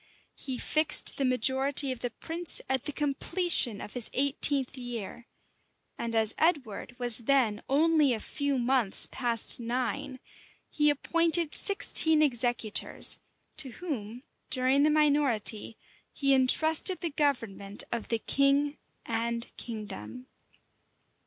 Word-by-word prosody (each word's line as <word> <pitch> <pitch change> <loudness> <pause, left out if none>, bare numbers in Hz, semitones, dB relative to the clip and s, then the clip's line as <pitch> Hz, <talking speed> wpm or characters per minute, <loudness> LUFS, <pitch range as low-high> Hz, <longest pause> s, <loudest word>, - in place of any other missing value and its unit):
He 260 -2 -6
fixed 310 +5 +2
the 275 - -1
majority 265 +2 +2
of 255 - -6
the 245 - -4
prince 330 +8 -2
at 265 -2 -2
the - - -2
completion 295 - 0
of - - -10
his 245 -3 0
eighteenth 275 -1 +2
year; 240 -2 -8 0.7
and 230 -1 -5
as 220 -1 +3
Edward 275 - -2
was 240 -2 +6
then 235 -4 0
only 305 0 +2
a 230 - -2
few 285 +4 -3
months 245 -4 +1
past 240 -3 +1
nine, 250 +2 -4 0.5
he 300 0 +2
appointed 335 +2 0
sixteen 320 -5 +3
executors; 240 -5 +2 0.4
to 295 -4 0
whom, 245 - -7 0.3
during 260 +2 +2
the 300 - +3
minority, 280 -8 +1 0.3
he 275 -1 0
intrusted 315 +7 +4
the 335 - -3
government 230 -9 -3
of 235 -2 -5
the 230 - -1
king 280 +4 0 0.3
and 235 +1 -4
kingdom. 225 +2 -9
260 Hz, 120 wpm, -27 LUFS, 235-295 Hz, 0.7 s, was